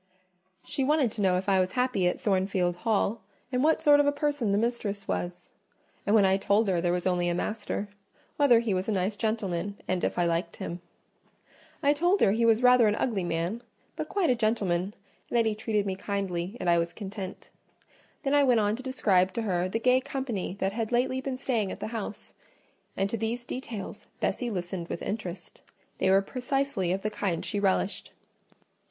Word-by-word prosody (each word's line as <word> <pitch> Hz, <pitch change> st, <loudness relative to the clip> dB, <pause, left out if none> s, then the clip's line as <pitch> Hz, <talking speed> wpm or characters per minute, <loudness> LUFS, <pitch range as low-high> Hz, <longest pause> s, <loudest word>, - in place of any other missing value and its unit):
She 275 Hz, -, -1 dB
wanted 285 Hz, -4 st, +2 dB
to 215 Hz, -, -4 dB
know 185 Hz, -2 st, +3 dB
if 185 Hz, -, -4 dB
I 195 Hz, -1 st, +4 dB
was 185 Hz, 0 st, 0 dB
happy 250 Hz, -8 st, +1 dB
at 180 Hz, -, -1 dB
Thornfield 190 Hz, -3 st, +1 dB
Hall, 220 Hz, +2 st, 0 dB, 0.3 s
and 250 Hz, 0 st, +1 dB
what 315 Hz, +1 st, +3 dB
sort 290 Hz, -1 st, +7 dB
of 290 Hz, -, +4 dB
a -, -, +5 dB
person 285 Hz, -6 st, 0 dB
the 200 Hz, -, +2 dB
mistress 210 Hz, -3 st, -2 dB
was; 175 Hz, 0 st, -4 dB, 0.6 s
and 205 Hz, -, +4 dB
when 205 Hz, -3 st, +6 dB
I 190 Hz, 0 st, +4 dB
told 200 Hz, +2 st, +2 dB
her 180 Hz, -3 st, +1 dB
there 175 Hz, 0 st, +1 dB
was 180 Hz, 0 st, -1 dB
only 175 Hz, -1 st, +1 dB
a 175 Hz, -, 0 dB
master, 210 Hz, +1 st, -3 dB, 0.5 s
whether 250 Hz, -6 st, +5 dB
he 225 Hz, -4 st, 0 dB
was 185 Hz, +3 st, -1 dB
a -, -, +1 dB
nice 195 Hz, +2 st, 0 dB
gentleman, 200 Hz, -3 st, -2 dB
and 185 Hz, -1 st, -1 dB
if -, -, -1 dB
I 175 Hz, -, +3 dB
liked 170 Hz, 0 st, -1 dB
him. 175 Hz, +1 st, -6 dB, 1.0 s
I 285 Hz, +1 st, +5 dB
told 350 Hz, +6 st, +2 dB
her 195 Hz, -, +5 dB
he 230 Hz, +2 st, +2 dB
was 225 Hz, +1 st, +4 dB
rather 250 Hz, -2 st, +6 dB
an 210 Hz, -, +2 dB
ugly 215 Hz, -5 st, -1 dB
man, 170 Hz, +6 st, -2 dB, 0.3 s
but -, -, -4 dB
quite 375 Hz, -9 st, +2 dB
a -, -, +3 dB
gentleman; 205 Hz, -4 st, 0 dB, 0.3 s
and -, -, +1 dB
that 230 Hz, -, +4 dB
he 220 Hz, -, +1 dB
treated 210 Hz, -1 st, -1 dB
me 190 Hz, -1 st, -2 dB
kindly, 195 Hz, 0 st, -3 dB
and 180 Hz, -, -3 dB
I 170 Hz, 0 st, +5 dB
was 170 Hz, 0 st, -2 dB
content. 195 Hz, -2 st, -7 dB, 0.7 s
Then 275 Hz, -1 st, 0 dB
I 290 Hz, -1 st, +5 dB
went 250 Hz, -4 st, +4 dB
on 210 Hz, 0 st, +1 dB
to -, -, -7 dB
describe 195 Hz, -8 st, +2 dB
to 230 Hz, -, -2 dB
her 180 Hz, -3 st, 0 dB
the 220 Hz, -, -1 dB
gay 250 Hz, +2 st, +3 dB
company 260 Hz, -9 st, -4 dB
that 195 Hz, +1 st, 0 dB
had 225 Hz, 0 st, -2 dB
lately 255 Hz, +2 st, +1 dB
been 265 Hz, -1 st, -3 dB
staying 230 Hz, -7 st, -1 dB
at -, -, -7 dB
the -, -, -4 dB
house; 215 Hz, -2 st, -6 dB, 0.6 s
and 195 Hz, -, +1 dB
to 230 Hz, -, -1 dB
these 230 Hz, +2 st, -3 dB
details 230 Hz, -6 st, -6 dB
Bessie 245 Hz, -, -1 dB
listened 180 Hz, -3 st, -4 dB
with -, -, -5 dB
interest: 190 Hz, -4 st, -6 dB, 0.4 s
they 190 Hz, -, +2 dB
were 195 Hz, +1 st, +5 dB
precisely 255 Hz, -5 st, -1 dB
of 190 Hz, +1 st, -2 dB
the 215 Hz, -, -1 dB
kind 185 Hz, -5 st, -2 dB
she 205 Hz, -, -1 dB
relished. 195 Hz, 0 st, 0 dB
210 Hz, 205 wpm, -28 LUFS, 185-240 Hz, 1.0 s, sort